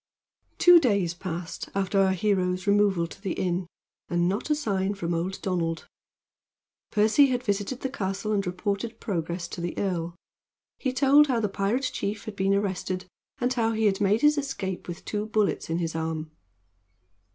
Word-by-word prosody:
Two 355 -1 +8
days 200 - +1
passed 175 -1 -6
after 195 0 +1
our 190 -1 +4
hero's 185 -1 0
removal 200 -4 +3
to 170 - -11
the 195 -4 -2
inn, 180 -1 -1 0.4
and 175 0 +2
not 200 +10 -2
a 300 - +4
sign 200 -8 -1
from 175 -3 -2
old 175 +3 -2
Donald. 170 -3 -1 1.0
Percy 220 +7 +5
had 250 -1 -1
visited 205 +3 -2
the 265 - -2
castle 200 -3 -3
and 200 -3 0
reported 200 +5 -3
progress 170 -2 -3
to 175 - -6
the 175 0 -4
earl. 175 -3 -2 0.6
He 260 - 0
told 275 +3 +5
how 250 -4 +1
the 210 -2 0
pirate 205 +7 0
chief 205 +1 -3
had 215 - -6
been 195 0 +2
arrested, 185 -2 -2 0.3
and 250 -1 0
how 225 -2 +1
he 220 0 0
had 195 -1 +2
made 205 +3 +3
his 295 0 +4
escape 200 -10 -4
with 175 -1 -7
two 210 0 -2
bullets 215 -5 0
in 165 - 0
his 165 -2 -2
arm. 160 -1 -3
195 Hz, 175 wpm, -26 LUFS, 180-220 Hz, 1.0 s, Two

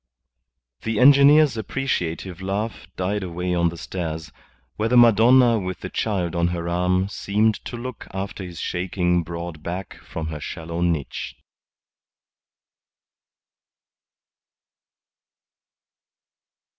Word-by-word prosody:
The 115 -2 -2
engineer's 140 0 +6
appreciative 95 -7 -3
laugh 100 0 -3
died 100 +3 -1
away 90 0 -3
down 85 -1 +2
the 85 - -8
stairs, 80 -3 -5 0.4
where 110 +1 -1
the 125 - +4
Madonna 120 +1 +6
with 95 -2 -5
the - - -6
Child 90 -5 -1
on 85 0 +2
her 85 -1 -3
arm 90 +2 +1
seemed 105 +2 0
to 120 - -5
look 125 +2 -7
after 95 0 -5
his 90 -2 -8
shaking 90 -1 0
broad 85 -1 -6
back 90 +3 -6
from 80 -1 -5
her 75 -1 -5
shallow 85 +3 -5
niche. 85 -5 -2
90 Hz, 105 wpm, -23 LUFS, 85-110 Hz, 0.4 s, engineer's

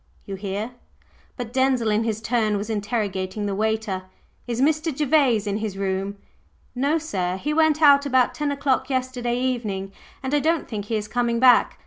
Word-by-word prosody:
"You 200 - -6
hear?" 200 +4 -4 0.7
But 245 -2 -6
Denzil 260 -4 +2
in 215 +2 +1
his 220 -1 -2
turn 215 -2 +1
was 205 +3 -4
interrogating 205 -2 -2
the 200 - -1
waiter. 215 -2 -1 0.4
"Is 235 -1 -2
Mr. 310 +4 +2
Gervase 275 -6 +2
in 205 0 -1
his 215 -3 -4
room?" 195 +1 -2 0.6
"No, 280 +5 +1
sir. 185 - -2
He 295 +10 -2
went 315 0 +3
out 285 -1 +6
about 260 -2 +3
ten 295 -1 -2
o'clock 270 -2 0
yesterday 250 -2 -1
evening, 215 -7 -2 0.3
and 265 +2 -3
I 295 - +4
don't 325 +2 0
think 210 -3 -5
he 225 - -2
is 210 -1 -2
coming 235 +1 0
back. 250 -1 +5
235 Hz, 175 wpm, -23 LUFS, 205-265 Hz, 0.7 s, out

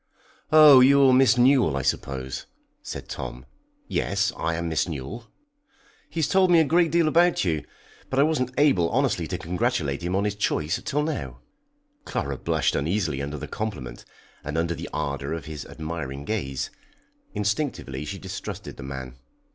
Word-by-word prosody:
"Oh, 155 -3 +9
you're 135 0 +6
Miss 130 0 +5
Newell, 125 - +4
I 70 - -2
suppose," 65 -1 -3 0.3
said - - -7
Tom. 60 +2 -6 0.4
"Yes, 100 0 0
I 80 0 -1
am 85 0 -3
Miss 80 +2 0
Newell." 85 - -6 0.8
"He 165 - -3
has 150 - +2
told 190 +1 +3
me 170 -1 +6
a - - +6
great 165 +2 +3
deal 165 0 +3
about 170 +3 +3
you, 80 -4 0 0.5
but 130 - -3
I 140 - +6
wasn't 145 -5 +1
able 135 - +4
honestly - - 0
to - - -3
congratulate 85 - -1
him 90 +2 -2
on 100 - +1
his 105 -1 0
choice 90 -4 -1
till 150 +1 0
now." 155 -1 -4 0.6
Clara 70 - -3
blushed - - 0
uneasily 80 -2 -1
under 70 +2 -4
the - - -6
compliment, 65 - -5 0.4
and 75 +2 -4
under 85 +1 0
the - - -7
ardour 70 +1 -3
of 80 -4 -5
his 75 -2 -7
admiring 70 -3 -6
gaze. 70 -11 -3 0.6
Instinctively 105 - -2
she 85 +6 -5
distrusted 95 0 -7
the - - -8
man. 65 -1 -7
90 Hz, 165 wpm, -25 LUFS, -, 0.8 s, Oh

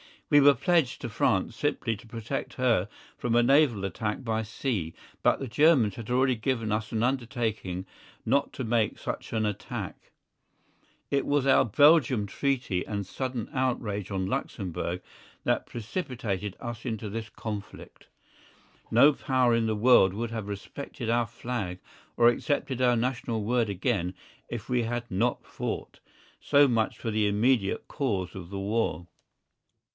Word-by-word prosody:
We 145 - +8
were 145 0 +7
pledged 165 -1 +1
to 120 - -4
France 95 +1 +1
simply 130 -6 0
to 115 - -15
protect 115 +4 -4
her 115 -7 +2 0.3
from 120 -1 0
a 120 - +5
naval 135 -5 +4
attack 105 +6 -3
by 110 -2 -1
sea, 105 - -3 0.3
but - - +3
the 135 - -4
Germans 130 - +4
had 115 -1 -8
already 130 +1 +3
given 115 -1 -1
us 110 +2 -1
an 110 -1 0
undertaking 115 -7 -2 0.4
not 140 +1 +1
to 130 - -4
make 115 -2 +1
such - - -5
an 110 -1 +1
attack. 105 -2 -5 1.0
It 140 -1 +1
was 145 -2 +1
our 135 - +5
Belgian 130 -2 +5
treaty 120 -6 -1
and 105 -2 -2
the 95 - -9
sudden 130 -4 -3
outrage 115 -7 -1
on 95 -2 -1
Luxemburg 90 -2 -3 0.4
that - - 0
precipitated 115 - -4
us 120 -1 -6
into 110 -3 -3
this 110 +1 -5
conflict. 105 -2 -8 0.8
No 140 +6 +6
Power 130 -3 +2
in 115 -1 +2
the 110 - 0
world 105 -4 +5
would 115 +3 -3
have 110 -3 -4
respected 110 +4 -6
our 120 -1 +2
Flag 115 -5 -4 0.4
or 120 0 +7
accepted 130 0 -1
our 125 -1 +4
national 120 -2 -1
word 115 0 +1
again 95 -2 -1 0.3
if 115 -2 -5
we 125 -1 +2
had 120 +1 -3
not 115 +6 0
fought. - - -5 0.4
So 145 0 +5
much 115 -3 0
for 115 - -3
the 105 -1 +2
immediate 105 0 +1
cause 105 - -2
of 90 -3 -8
the 100 - -5
war. 95 -4 -1
115 Hz, 155 wpm, -28 LUFS, 105-130 Hz, 1.0 s, We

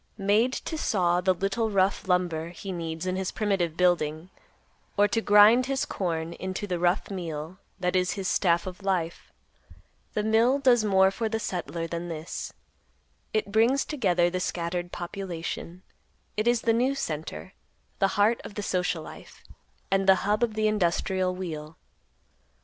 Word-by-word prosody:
Made 210 +5 +2
to 320 +2 -4
saw 180 -7 +1
the 185 +1 +3
little 200 +5 -1
rough 195 -1 +1
lumber 175 -3 0
he 185 +3 -7
needs 165 -1 -4
in 185 0 -1
his 190 -1 -2
primitive 190 -6 -1
building, 175 -1 +1 0.7
or 205 0 +5
to 215 +3 0
grind 215 +5 +6
his 270 -1 0
corn 165 -3 -3
into 190 +3 -4
the 180 -3 -2
rough 175 +4 +1
meal, 165 -2 -5 0.2
that 180 0 0
is 180 0 +2
his 195 -2 -4
staff 170 -3 +2
of 185 +1 -7
life, 180 -4 -2 0.8
the 210 - 0
mill 225 +5 +3
does 250 -5 +4
more 190 -2 +4
for 225 +2 -2
the 225 0 -1
settler 170 -5 -3
than 170 +1 -4
this; 160 -1 -5 0.8
it 215 -2 -1
brings 235 +6 +3
together 185 - +2
the 185 - -2
scattered 175 0 -3
population, 175 -1 -6 0.5
it 215 +2 0
is 240 -1 +3
the 230 - +2
news 255 +4 +1
center, 160 +4 -5 0.5
the 195 - +4
heart 215 +3 +3
of 205 - -9
the 205 - -4
social 180 -4 -1
life, - - -12 0.5
and 195 0 +2
the 190 - +8
hub 210 +1 +1
of 230 -3 0
the 215 0 +2
industrial 185 -2 0
wheel. 160 -4 -6
185 Hz, 160 wpm, -27 LUFS, 175-210 Hz, 0.8 s, the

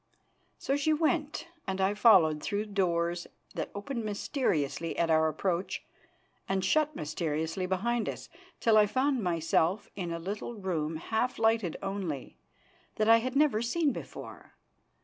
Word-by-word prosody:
So 275 - -1
she 290 +2 +2
went 310 0 0 0.2
and 190 0 -2
I 190 +1 +2
followed 185 -9 +5
through 205 +1 -2
doors 175 -4 0 0.3
that - - -3
opened 235 +4 -4
mysteriously 170 - -1
at 165 -1 +2
our 160 0 +4
approach 175 +4 -2 0.7
and 190 -1 0
shut 305 +8 +2
mysteriously 160 +3 -2
behind 225 +6 0
us, - - -7 0.3
till 225 -2 +4
I 210 - +5
found 260 +3 +1
myself 170 +2 +1
in 175 -4 -4
a 170 - -2
little 200 +7 -5
room 165 -6 -2
half 220 +9 -1
lighted 225 -6 +2
only, 190 -8 -4 0.6
that 215 +1 +1
I 230 - +9
had 255 +3 -3
never 280 -7 +3
seen 290 +6 +1
before. - - -9
200 Hz, 145 wpm, -30 LUFS, 170-235 Hz, 0.7 s, I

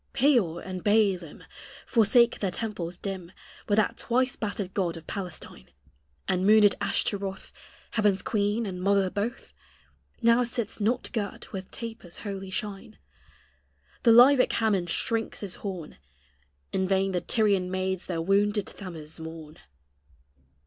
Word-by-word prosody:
Peor 235 - +3
and 185 -1 -6
Baälim 200 -6 +1 0.4
Forsake 235 +1 +4
their 195 - 0
temples 180 -4 -4
dim, 185 -3 -6 0.4
With 205 - +3
that 215 - +2
twice 250 +1 +1
battered 205 -3 -4
god 175 -4 -1
of 165 - -11
Palestine; 175 - -7 0.6
And 185 0 +1
moonèd 210 0 +6
Ashtaroth, 200 -1 -2 0.4
Heaven's 205 -3 +2
queen 210 +1 0
and 180 -3 -5
mother 195 -1 +2
both. 225 +5 -4 0.7
Now 235 0 +4
sits 235 -3 -2
not 235 +4 0
girt 205 -3 -4
with 190 -1 -6
tapers' 225 -7 -7
holy 195 -2 -5
shine; 200 +2 -5 1.0
The 235 - +4
Lybic 250 +3 +7
Hammon 205 -6 +1
shrinks 225 +6 -2
his 200 -3 -5
horn 180 - -6 0.7
In 190 0 +1
vain 195 0 +2
the 180 -1 -1
Tyrian 200 -5 +2
maids 185 0 -2
their 165 -3 -2
wounded 205 +2 +2
Thammuz 165 -5 -8
mourn. 160 -1 -9
200 Hz, 130 wpm, -27 LUFS, 185-220 Hz, 1.0 s, Lybic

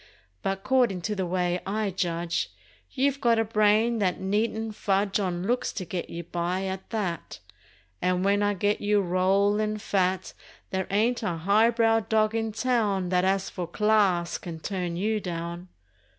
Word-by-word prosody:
But 195 - -2
'cordin' 245 -8 +2
to 210 +4 -2
the 190 -2 -2
way 180 0 0
I 210 0 -1
judge 170 -2 -1 0.4
You've 280 +1 0
got 235 -2 +4
a 225 - +3
brain 215 +2 +3
that 185 -3 0
needn't 220 +3 -1
fudge 200 -1 0
On 180 -3 -2
looks 245 +4 0
to 190 -4 -4
get 175 0 -4
you 170 0 -6
by, 175 +3 -2
at 190 0 -5
that, 195 -7 -3 0.6
And 180 +1 +1
when 200 +1 +3
I 205 0 +1
get 205 +3 0
you 205 0 +3
rollin' 200 +3 +2
fat 190 -2 0 0.4
There 190 0 -1
ain't 225 +5 +1
a 180 -7 -2
high 200 +7 +4
brow 225 -1 +3
dog 215 0 +1
in 225 -1 -1
town 210 -6 0
That 180 0 +2
as 190 0 0
for 180 -2 -4
"class" 195 -3 +2
can 165 -2 -7
turn 180 -1 -3
you 215 +3 0
down! 170 -1 -5
195 Hz, 165 wpm, -27 LUFS, 180-215 Hz, 0.6 s, got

